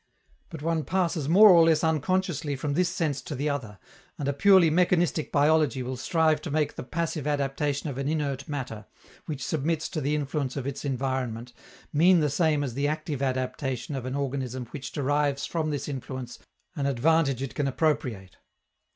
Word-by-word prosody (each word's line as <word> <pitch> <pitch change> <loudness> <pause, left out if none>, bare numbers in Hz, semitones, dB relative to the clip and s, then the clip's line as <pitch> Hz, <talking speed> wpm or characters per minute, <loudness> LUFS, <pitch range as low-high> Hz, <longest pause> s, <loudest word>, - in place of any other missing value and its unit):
But 160 -3 -8
one 165 -1 0
passes 170 -5 -1
more 205 +4 +8
or 170 -2 +7
less 165 -1 +3
unconsciously 160 -1 0
from 140 +2 -3
this 175 +3 +2
sense 160 -6 -1
to 150 - -6
the 145 +3 -1
other, 115 -8 -4 0.4
and 140 - -3
a 140 - +1
purely 185 +1 +5
mechanistic 175 -2 +2
biology 150 -3 +3
will 130 +1 -4
strive 155 +3 +1
to 165 - -6
make 150 0 0
the - - -5
passive 155 +2 -3
adaptation 145 0 -1
of 135 -2 -4
an 135 - -2
inert 145 -3 -2
matter, 125 -7 -5 0.4
which 150 -4 -4
submits 160 +1 -1
to 155 - -3
the 145 +2 0
influence 145 -2 -2
of 135 - -3
its 140 -1 -4
environment, 130 -3 -3 0.4
mean 175 +4 +5
the 150 -3 +1
same 155 -1 +2
as 130 -4 -3
the 140 +3 0
active 155 -2 -3
adaptation 130 0 -2
of 130 -2 -4
an 130 - -3
organism 130 -3 -3
which 135 - -6
derives 145 0 0
from 160 -2 -2
this 145 -2 -3
influence 130 -2 -6 0.4
an 140 -3 -1
advantage 140 0 +2
it 135 - -5
can 145 -2 -1
appropriate. 130 - -1
145 Hz, 180 wpm, -27 LUFS, 135-160 Hz, 0.4 s, more